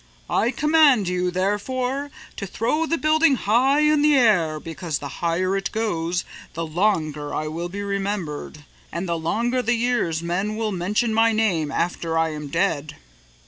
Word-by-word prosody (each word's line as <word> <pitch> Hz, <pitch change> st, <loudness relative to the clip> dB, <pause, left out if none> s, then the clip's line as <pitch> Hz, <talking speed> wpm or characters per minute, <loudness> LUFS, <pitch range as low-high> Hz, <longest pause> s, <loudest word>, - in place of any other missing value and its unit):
"I 230 Hz, -, +2 dB
command 295 Hz, -, +4 dB
you, 180 Hz, 0 st, 0 dB
therefore, 250 Hz, +9 st, -1 dB, 0.3 s
to 200 Hz, -, -5 dB
throw 300 Hz, -, -1 dB
the 330 Hz, -, +1 dB
building 310 Hz, -1 st, +3 dB
high 255 Hz, +6 st, +2 dB
in 300 Hz, -1 st, +3 dB
the 300 Hz, 0 st, +4 dB
air 180 Hz, -, +3 dB
because 165 Hz, -1 st, -4 dB
the 145 Hz, -, -6 dB
higher 180 Hz, +3 st, +1 dB
it 195 Hz, -, -2 dB
goes 180 Hz, -6 st, -1 dB, 0.3 s
the 165 Hz, 0 st, -2 dB
longer 155 Hz, -4 st, -1 dB
I 155 Hz, -, -2 dB
will 170 Hz, +3 st, -4 dB
be 200 Hz, +3 st, -5 dB
remembered 195 Hz, -7 st, -4 dB, 0.3 s
and 175 Hz, +2 st, -4 dB
the 170 Hz, -, 0 dB
longer 235 Hz, +10 st, 0 dB
the 240 Hz, 0 st, +1 dB
years 230 Hz, -9 st, 0 dB
men 190 Hz, +5 st, -1 dB
will 220 Hz, -1 st, -2 dB
mention 205 Hz, +5 st, 0 dB
my 225 Hz, +1 st, +4 dB
name 180 Hz, -9 st, +1 dB
after 165 Hz, 0 st, -1 dB
I 160 Hz, 0 st, +2 dB
am 150 Hz, -1 st, -6 dB
dead." 150 Hz, -2 st, -1 dB
195 Hz, 165 wpm, -23 LUFS, 165-240 Hz, 0.3 s, command